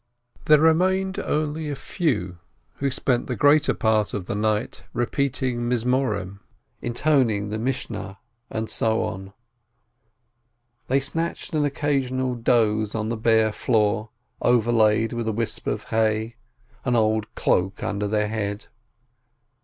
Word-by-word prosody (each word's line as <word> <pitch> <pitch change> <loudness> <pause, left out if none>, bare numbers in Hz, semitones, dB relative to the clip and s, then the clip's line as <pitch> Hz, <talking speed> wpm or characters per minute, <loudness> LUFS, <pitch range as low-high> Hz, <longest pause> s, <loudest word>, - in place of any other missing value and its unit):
There 150 - +7
remained 185 +4 +2
only 150 0 -2
a 145 - -2
few, 105 - -2 0.4
who 140 - 0
spent 130 -2 0
the 125 - -2
greater 145 +5 +4
part 110 -2 +1
of 100 -3 -4
the - - -3
night 105 +1 -1
repeating 125 -1 -1
Psalms, 110 -6 -1 0.4
intoning 120 -5 +1
the 110 +1 -3
Mish 130 +3 -2
nah, 105 -3 -6 0.3
and 110 0 -3
so 110 0 0
on; 95 +1 -5 1.6
they 135 +2 +3
snatched 165 +6 -3
an 150 -1 +2
occasional 135 -3 0
doze 110 -3 +1
on 110 0 -2
the 115 - -1
bare 110 -1 +3
floor 105 -1 +1 0.3
overlaid 115 -2 +3
with 120 -1 -3
a - - +1
whisp 115 +1 -2
of - - -1
hay, 110 +1 0 0.5
an 125 -2 +1
old 110 -1 +2
cloak 95 +3 0
under 105 -2 -1
their 105 0 +1
head. 105 0 -3
115 Hz, 130 wpm, -24 LUFS, 105-135 Hz, 1.6 s, There